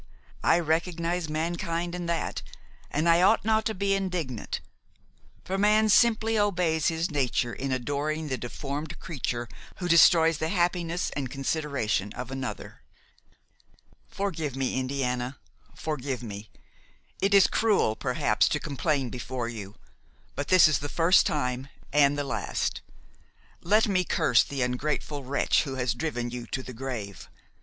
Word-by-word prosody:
I - - +5
recognize 170 +1 -1
mankind 170 +2 -2
in 175 -1 -4
that, 170 -1 -2 0.5
and 155 +3 0
I 170 +1 +5
ought 200 +3 +4
not 220 0 +2
to 220 - -1
be 195 +1 +1
indignant; 180 - -3 0.9
for 195 +1 -2
man 215 +1 +4
simply 225 0 +4
obeys 180 -6 +1
his 165 0 0
nature 125 -4 0
in 135 +6 -4
adoring 145 +4 -2
the 130 - -1
deformed 140 +4 -5
creature 120 -6 -3 0.3
who 180 - -4
destroys 165 -1 +6
the 160 - -1
happiness 175 -1 0
and 135 -3 -3
consideration 135 -7 -1
of 125 +1 -6
another. 135 -1 -6 1.3
"Forgive 160 -9 -3
me, 130 -1 -1
Indiana, 130 -1 -2 0.4
forgive 135 -5 -4
me! 105 -1 -7 0.7
it 200 +1 +3
is 195 - +8
cruel 210 - +2
perhaps - - +1
to - - 0
complain 140 -3 -1
before 125 -1 -4
you, 105 -3 -8 0.6
but 145 - -4
this 185 -3 +7
is 155 - +2
the 145 - -5
first 170 +4 +4
time 130 -2 -2 0.3
and 145 -1 +4
the 145 - -1
last; 115 -7 -2 0.8
let 210 +6 +3
me 185 -3 +2
curse 155 -8 +3
the 135 -2 -2
ungrateful 140 +3 -2
wretch 135 +3 +2
who 135 -2 -4
has 125 -3 0
driven 120 -2 -3
you 120 -1 -6
to 130 - -4
the 130 - -8
grave. 115 -5 -6
150 Hz, 145 wpm, -27 LUFS, 130-175 Hz, 1.3 s, is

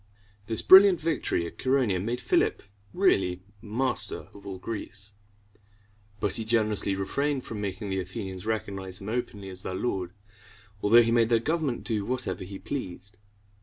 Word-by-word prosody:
This 110 -1 +1
brilliant 190 -2 +8
victory 150 - -1
at 85 - -9
Chæronea 125 -9 +1
made 120 +3 -3
Philip - - +1 0.3
really 95 - +1 0.2
master 120 +4 +1
of 100 0 -13
all 95 -1 -5
Greece; 105 0 -7 1.1
but 105 -3 0
he 115 - -2
generously 110 -3 +1
refrained 135 +8 -1
from 105 -2 -6
making 100 0 -4
the 95 - -1
Athenians 95 0 -6
recognize 95 -4 -3
him 100 +1 -7
openly 105 -4 -4
as 95 0 -6
their 95 - -5
lord, 95 -4 -2 0.7
although 115 +3 +6
he 115 - 0
made 115 -1 +3
their 115 - +4
government 150 +1 -1
do 110 -4 -1
whatever 125 -3 -2
he 95 +1 -8
pleased. 100 -6 -6
105 Hz, 155 wpm, -27 LUFS, 95-120 Hz, 1.1 s, brilliant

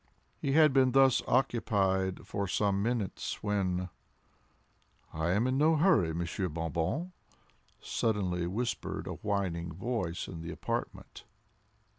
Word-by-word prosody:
He 135 - -1
had 155 -2 +6
been 130 -2 +4
thus 135 -2 +5
occupied 95 -7 +1
for 100 -1 -3
some 100 +1 +1
minutes 115 -3 -2
when 95 -3 0 1.2
"I 80 +2 -1
am 100 +6 +2
in 130 +1 +1
no 160 +2 +4
hurry, 155 - +4
Monsieur 85 +3 -2
Bon 80 +1 -3
Bon," 140 - -1 0.7
suddenly 90 -6 -1
whispered 115 +7 -3
a - - -5
whining 95 -5 -1
voice 95 -2 -3
in 85 -3 -7
the 85 +1 -6
apartment. - - -5
100 Hz, 125 wpm, -31 LUFS, 90-125 Hz, 1.2 s, had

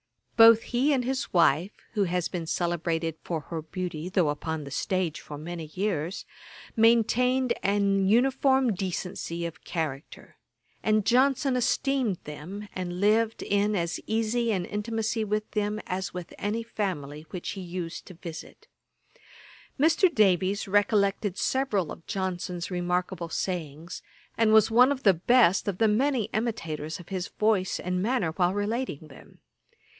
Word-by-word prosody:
Both 225 -1 +8
he 260 +4 +1
and 260 -4 +1
his 260 +1 -2
wife, 170 +2 +3 0.2
(who 205 -3 +2
has 180 -1 -1
been 170 -3 -5
celebrated 165 -1 -1
for 165 -2 -2
her 160 +2 -5
beauty,) 175 0 -5
though 185 -5 +2
upon 155 +1 -3
the 140 - -9
stage 185 -3 -1
for 145 - -8
many 165 +2 -6
years, 180 0 -3 0.5
maintained 235 +3 +3
an 200 -1 +2
uniform 265 +1 +3
decency 180 -2 -4
of 165 -2 -7
character; 155 -5 -5 0.4
and 215 -1 +2
Johnson 265 +2 +3
esteemed 250 -3 +1
them, 175 +8 -8
and 180 -1 -4
lived 220 +2 +2
in 205 +1 +1
as 170 -2 -1
easy 225 +1 0
an 185 -4 -1
intimacy 220 +1 -2
with 210 0 -2
them, 210 0 -1
as 185 0 -4
with 180 -2 -7
any 215 +3 -2
family 160 -9 -4
which 180 - -5
he 195 - -5
used 175 -2 -6
to 185 - -11
visit. 165 -1 -10 1.1
Mr. 330 +5 +4
Davies 195 - +2
recollected 200 -1 +1
several 215 - 0
of 165 - -10
Johnson's 180 -2 -3
remarkable 180 -1 -2
sayings, 165 -2 -4 0.3
and 225 -1 +3
was 220 0 +5
one 250 +4 +6
of 275 -1 -3
the 195 - +6
best 195 +2 +3
of 195 -3 -1
the 225 - +3
many 250 +3 +2
imitators 165 -9 -3
of 175 - -13
his 185 -1 -3
voice 210 -4 0
and 180 0 -2
manner, 215 -6 0
while 180 +2 +1
relating 205 - -2
them. 135 - -16
195 Hz, 145 wpm, -27 LUFS, 175-225 Hz, 1.1 s, Both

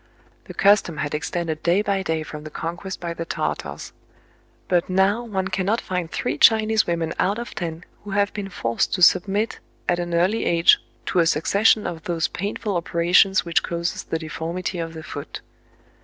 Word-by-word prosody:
The - - -10
custom 195 -5 +3
had 145 0 -3
extended 160 +1 -3
day 180 +4 +2
by 200 -2 0
day 160 -4 -1
from 150 -1 -8
the 155 - -7
conquest 175 +5 -5
by 170 -1 -4
the 165 - -5
Tartars; 165 - -4 0.7
but 175 -1 +1
now 195 +5 +2
one 190 -5 -2
cannot 195 +4 0
find 180 -3 -3
three 245 - -3
Chinese 220 -1 +5
women 165 -1 -1
out 200 +3 +1
of 235 0 -6
ten 165 0 -5 0.2
who 205 - -9
have 200 +1 +1
been 200 -2 -5
forced 115 -2 -1
to 180 - +1
submit 200 +5 +3 0.3
at 175 0 +1
an 175 -1 -2
early 185 +6 +2
age 170 0 +5 0.3
to 185 - +1
a 165 - +4
succession 200 +7 +3
of 160 -2 -5
those 170 -2 0
painful 200 0 -3
operations 175 +3 +3
which 170 -1 +2
causes 170 0 -3
the 165 - -3
deform 160 +2 -5
ity 185 -1 -3
of 165 0 -5
the 160 - -7
foot. 145 - -7
175 Hz, 185 wpm, -23 LUFS, 165-200 Hz, 0.7 s, Chinese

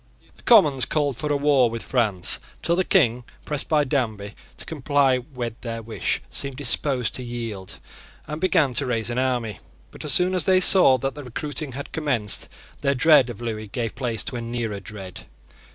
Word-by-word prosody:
The - - -20
Commons 150 - +5
called 145 -4 0
for 150 +4 -3
a 145 - +2
war 140 -4 +3
with 115 0 -6
France, 110 -8 0 0.2
till 170 - +2
the 185 - +1
King, 125 - +2 0.2
pressed 150 -2 -3
by 150 -2 +3
Danby 110 -7 -2 0.2
to - - -7
comply 140 -3 +1
with 120 -4 -7
their 115 -1 -5
wish, 110 0 -2
seemed 140 -2 -5
disposed 130 -2 0
to 130 - -1
yield, 115 -6 -6 0.5
and 150 +1 -6
began 165 -8 +2
to 135 +2 +1
raise 115 -1 -1
an 120 - -1
army. 125 -5 -1 0.3
But, - - -10
as - - 0
soon 180 +1 +2
as 180 -4 +2
they 185 -1 +4
saw 180 -8 +7
that 135 +2 -3
the 145 - -9
recruiting 145 +3 -5
had 140 +2 -7
commenced, 125 -10 -1 0.3
their 140 -1 +1
dread 135 -1 +5
of 120 -1 -8
Lewis 110 -3 -5
gave 115 -1 -3
place 120 -5 -2
to 125 - -5
a - - -4
nearer 115 -3 -3
dread. 95 -3 -10
130 Hz, 190 wpm, -23 LUFS, 115-145 Hz, 0.5 s, saw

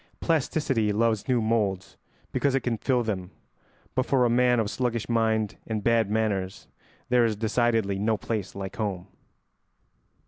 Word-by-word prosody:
Plasticity 135 -8 +1
loves 110 0 +1
new 125 -2 +2
moulds 105 -5 -1 0.4
because 140 -2 +1
it 135 - +1
can 115 -3 -2
fill 125 0 +1
them, 95 -5 -3 0.6
but 130 - +1
for 130 -2 +2
a 120 - +2
man 125 0 +3
of 110 - +1
sluggish 120 -3 -2
mind 110 -3 +1
and 110 -2 -3
bad 115 -2 +3
manners 105 -3 -1 0.4
there 125 -1 +4
is 115 -2 +1
decidedly 110 -2 +1
no 110 +1 +1
place 105 -3 -4
like 95 -1 -6
home. 100 -5 -3
110 Hz, 150 wpm, -26 LUFS, 105-120 Hz, 0.6 s, there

